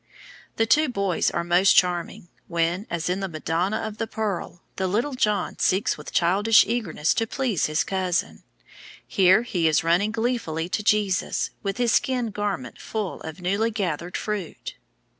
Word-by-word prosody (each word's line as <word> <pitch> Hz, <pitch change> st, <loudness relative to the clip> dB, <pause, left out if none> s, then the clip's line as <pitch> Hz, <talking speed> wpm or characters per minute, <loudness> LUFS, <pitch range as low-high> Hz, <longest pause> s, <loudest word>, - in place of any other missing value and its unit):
The 225 Hz, -, +2 dB
two 300 Hz, +5 st, +3 dB
boys 200 Hz, -6 st, 0 dB
are 170 Hz, -, -2 dB
most 175 Hz, +3 st, +4 dB
charming, 175 Hz, -1 st, +1 dB, 0.2 s
when, 170 Hz, +4 st, -1 dB
as 170 Hz, -1 st, -2 dB
in 180 Hz, +2 st, 0 dB
the 195 Hz, -, -2 dB
Madonna 170 Hz, +4 st, -1 dB
of 220 Hz, -1 st, -5 dB
the 225 Hz, -, -1 dB
Pearl, 205 Hz, -6 st, -4 dB
the 190 Hz, -, 0 dB
little 230 Hz, +10 st, 0 dB
John 210 Hz, -5 st, 0 dB
seeks 190 Hz, +3 st, +2 dB
with -, -, -10 dB
childish 200 Hz, +6 st, +4 dB
eagerness 205 Hz, -10 st, 0 dB
to 225 Hz, -, -1 dB
please 240 Hz, -, 0 dB
his 155 Hz, 0 st, +1 dB
cousin. 185 Hz, -2 st, -2 dB, 0.7 s
Here 190 Hz, +3 st, +4 dB
he 175 Hz, -8 st, 0 dB
is 155 Hz, 0 st, +2 dB
running 175 Hz, +6 st, +2 dB
gleefully 225 Hz, -9 st, -2 dB
to 210 Hz, -, -1 dB
Jesus, 205 Hz, -2 st, +1 dB
with 195 Hz, 0 st, -3 dB
his 240 Hz, -2 st, +2 dB
skin 245 Hz, -3 st, +1 dB
garment 200 Hz, -, -4 dB
full 215 Hz, -4 st, -4 dB
of 160 Hz, +3 st, -8 dB
newly 200 Hz, +5 st, +1 dB
gathered 180 Hz, -5 st, -3 dB
fruit. 205 Hz, -6 st, -5 dB
195 Hz, 160 wpm, -24 LUFS, 175-220 Hz, 0.7 s, most